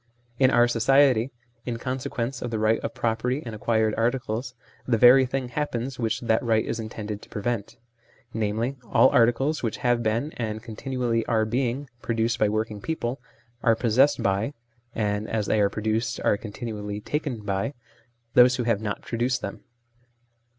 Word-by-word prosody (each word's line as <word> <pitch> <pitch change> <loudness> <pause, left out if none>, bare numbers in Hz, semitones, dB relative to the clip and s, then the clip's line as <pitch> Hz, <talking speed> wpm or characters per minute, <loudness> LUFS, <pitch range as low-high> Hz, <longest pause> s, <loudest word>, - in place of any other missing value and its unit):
In 130 -1 +6
our 120 -2 +5
society, 125 +1 +4 0.3
in 120 -2 -3
consequence 125 0 -3
of 120 - -3
the 115 - -2
right 110 +1 +2
of - - -5
property 120 +5 -1
in 115 - -6
acquired 110 0 +1
articles, 120 +1 -1 0.3
the 120 -2 +3
very 125 +3 +7
thing 130 -1 -3
happens 130 -2 -3
which 115 -2 -1
that 115 -2 +2
right 110 -2 +1
is 115 - -3
intended 110 -2 -5
to - - -15
pre 105 - -6
vent: 120 -1 -2 0.6
namely, 110 +5 -1
all - - +6
articles 125 +6 +2
which 115 -3 -2
have 120 -1 +3
been, 115 +6 0
and 110 -2 -3
continually 120 0 -2
are 110 -2 +2
being, 125 +4 -1
produced 115 0 0
by 105 - +3
working 110 -1 -2
people, 135 -4 -3 0.4
are 115 -1 +4
possessed 125 +5 +3
by 100 +8 0 0.4
(and 105 -1 -1
as 110 -2 -1
they 105 - +2
are 100 - +3
pro 105 +1 -6
duced 110 +1 0
are - - +4
continually 105 -1 -6
taken 140 -1 -3
by) 100 +7 -2 0.6
those 125 +1 +7
who 125 - -1
have 115 -3 +1
not 105 -2 -4
produced 120 +2 -1
them. 100 - -6
115 Hz, 170 wpm, -25 LUFS, 110-125 Hz, 0.6 s, very